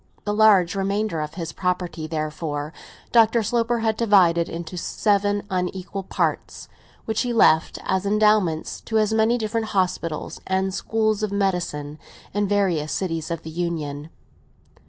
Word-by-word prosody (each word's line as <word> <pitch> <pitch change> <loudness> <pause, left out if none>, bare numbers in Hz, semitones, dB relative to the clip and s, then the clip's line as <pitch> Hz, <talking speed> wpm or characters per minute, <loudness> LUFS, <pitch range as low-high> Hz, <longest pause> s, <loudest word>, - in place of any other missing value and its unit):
The 205 - -1
large 205 -5 +5
remainder 195 -3 -1
of 150 +1 -5
his 165 -3 -5
property, 180 -3 -2
therefore, 155 -1 -4 0.4
Dr. 230 0 +4
Sloper 235 +1 0
had 220 -1 +1
divided 180 -7 +4
into 170 +1 -6
seven 205 +2 0
unequal 185 +1 -3
parts, 190 - -2 0.4
which 220 0 -1
he 245 - -1
left, 160 -8 +4
as 190 0 0
endowments, 205 -5 +2
to 220 - 0
as 215 0 +2
many 220 +2 +3
different 220 0 -2
hospitals 180 -4 -2
and 190 0 0
schools 215 +1 0
of 215 -2 -1
medicine, 175 -7 -2 0.3
in 205 0 0
various 185 -7 +1
cities 165 -3 -2
of 170 -1 -4
the 160 - -7
Union. 155 -3 -3
190 Hz, 140 wpm, -23 LUFS, 165-215 Hz, 0.4 s, large